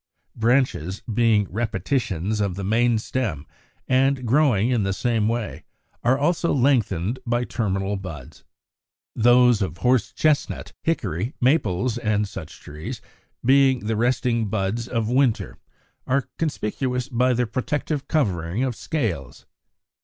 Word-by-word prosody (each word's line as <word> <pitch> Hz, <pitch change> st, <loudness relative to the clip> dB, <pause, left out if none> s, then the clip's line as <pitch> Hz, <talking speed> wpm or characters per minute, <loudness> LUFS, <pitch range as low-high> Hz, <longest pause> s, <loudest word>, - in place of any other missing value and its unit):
Branches, 110 Hz, -, +1 dB
being 110 Hz, -2 st, +2 dB
repetitions 110 Hz, -, -1 dB
of 100 Hz, -3 st, -1 dB
the 100 Hz, -, -5 dB
main 115 Hz, +4 st, +2 dB
stem 110 Hz, -, -3 dB, 0.4 s
and 130 Hz, 0 st, +2 dB
growing 125 Hz, -3 st, +3 dB
in 120 Hz, -3 st, +2 dB
the 95 Hz, -1 st, 0 dB
same 115 Hz, 0 st, 0 dB
way, 115 Hz, -1 st, -3 dB, 0.4 s
are 130 Hz, +3 st, +3 dB
also 170 Hz, +4 st, +1 dB
lengthened 120 Hz, -, +1 dB
by 120 Hz, 0 st, 0 dB
terminal 100 Hz, -4 st, -2 dB
buds. 80 Hz, -9 st, -9 dB, 0.7 s
Those 120 Hz, -1 st, +5 dB
of 90 Hz, -4 st, -2 dB
Horse 125 Hz, +5 st, +2 dB
chestnut, 155 Hz, -1 st, 0 dB
Hickory, 115 Hz, -, -2 dB
Maples, 120 Hz, -, +1 dB
and 105 Hz, -2 st, 0 dB
such -, -, -9 dB
trees, 75 Hz, +1 st, -7 dB, 0.5 s
being 135 Hz, -1 st, +4 dB
the 110 Hz, +1 st, 0 dB
resting 115 Hz, -1 st, +1 dB
buds 110 Hz, +3 st, -2 dB
of 115 Hz, -4 st, -1 dB
winter, 125 Hz, -1 st, +1 dB, 0.5 s
are 135 Hz, +1 st, +1 dB
conspicuous 125 Hz, -4 st, -2 dB
by 125 Hz, 0 st, +2 dB
their 125 Hz, 0 st, +1 dB
protective 145 Hz, +4 st, -2 dB
covering 95 Hz, -, 0 dB
of 130 Hz, -3 st, -1 dB
scales. 95 Hz, -, -3 dB
115 Hz, 125 wpm, -23 LUFS, 100-130 Hz, 0.7 s, Those